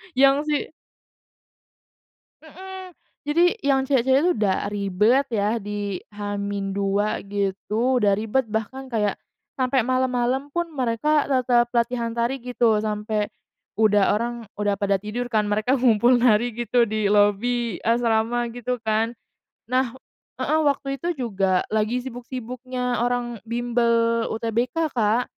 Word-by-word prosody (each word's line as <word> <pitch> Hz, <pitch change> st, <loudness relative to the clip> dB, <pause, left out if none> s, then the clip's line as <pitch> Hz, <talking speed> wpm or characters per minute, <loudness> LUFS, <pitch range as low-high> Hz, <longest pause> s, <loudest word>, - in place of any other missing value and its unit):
Yang 275 Hz, +1 st, +6 dB
si 295 Hz, -1 st, +2 dB, 1.8 s
Mhm. 375 Hz, +3 st, -10 dB, 0.3 s
Jadi, 315 Hz, +4 st, +2 dB, 0.2 s
yang 270 Hz, -1 st, +2 dB
cewek-cewek 265 Hz, 0 st, +3 dB
itu 360 Hz, -, +4 dB
udah 200 Hz, -3 st, 0 dB
ribet 210 Hz, +7 st, +2 dB
ya, 220 Hz, 0 st, 0 dB
di 205 Hz, -2 st, -4 dB
H-2 200 Hz, 0 st, -2 dB
gitu, 205 Hz, +5 st, -1 dB
udah 200 Hz, -1 st, +3 dB
ribet, 225 Hz, +2 st, -1 dB
bahkan 260 Hz, +5 st, -4 dB
kayak 210 Hz, -4 st, 0 dB, 0.4 s
sampai 255 Hz, -2 st, +1 dB
malam-malam 255 Hz, +1 st, 0 dB
pun 345 Hz, +3 st, -1 dB
mereka 280 Hz, +4 st, +1 dB
tetap 245 Hz, -2 st, +2 dB
latihan 235 Hz, 0 st, 0 dB
tari 240 Hz, +2 st, -1 dB
gitu, 235 Hz, -3 st, +1 dB
sampai 210 Hz, 0 st, -2 dB, 0.5 s
udah 210 Hz, -1 st, +4 dB
orang 235 Hz, +1 st, -2 dB, 0.2 s
udah 205 Hz, -1 st, +1 dB
pada 200 Hz, 0 st, +1 dB
tidur 215 Hz, +5 st, -5 dB
kan, 215 Hz, -2 st, +1 dB
mereka 215 Hz, +6 st, +1 dB
ngumpul 240 Hz, 0 st, +4 dB
nari 240 Hz, -1 st, +3 dB, 0.2 s
gitu, 245 Hz, +1 st, +2 dB
di 215 Hz, -1 st, -1 dB
lobi 210 Hz, +1 st, +2 dB
asrama, 235 Hz, +1 st, +1 dB
gitu 245 Hz, 0 st, -4 dB
kan. 220 Hz, +2 st, 0 dB, 0.5 s
Nah 255 Hz, +1 st, 0 dB, 0.4 s
heeh, 295 Hz, +5 st, +1 dB
waktu 275 Hz, -1 st, 0 dB
itu 345 Hz, +6 st, -2 dB
juga 195 Hz, -, 0 dB
lagi 220 Hz, +3 st, +1 dB
sibuk-sibuknya 250 Hz, 0 st, -4 dB
orang 240 Hz, -2 st, -1 dB
bimbel 235 Hz, -1 st, +1 dB
UTBK, 240 Hz, +7 st, -1 dB
Kak. 230 Hz, +1 st, +2 dB
235 Hz, 125 wpm, -23 LUFS, 210-255 Hz, 1.8 s, Yang